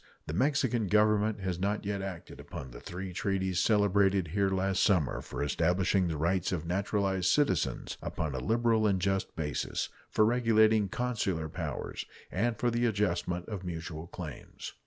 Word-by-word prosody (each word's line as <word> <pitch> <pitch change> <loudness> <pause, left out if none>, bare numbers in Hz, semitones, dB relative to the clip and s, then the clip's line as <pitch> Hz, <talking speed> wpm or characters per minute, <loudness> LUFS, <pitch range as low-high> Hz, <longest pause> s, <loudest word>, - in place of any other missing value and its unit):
The 75 - -5
Mexican 130 - +1
Government 105 +1 +3
has 90 -2 -2
not 100 +2 -1
yet 100 -1 -2
acted 95 -3 -7
upon 65 -2 -8
the - - -9
three 90 +5 -6
treaties 95 -1 0
celebrated 100 -4 +3
here 100 +3 +1
last 95 0 +1
summer 90 -9 +2
for - - -4
establishing 90 +5 +2
the 80 -2 -2
rights 85 +4 +1
of 85 -3 -2
naturalized 95 +1 0
citizens 90 - +1
upon 80 -4 -3
a 65 - -2
liberal 110 - +2
and 95 -2 +2
just 95 0 -1
basis, 75 -3 -2 0.2
for 110 - +3
regulating 110 -3 +4
consular 100 -10 -1
powers, - - -4 0.3
and 115 +4 0
for 120 - +1
the 120 +1 +2
adjustment 90 -4 -1
of 105 -4 -5
mutual 85 -2 -5
claims. 80 -7 -8
95 Hz, 155 wpm, -30 LUFS, 85-105 Hz, 0.3 s, regulating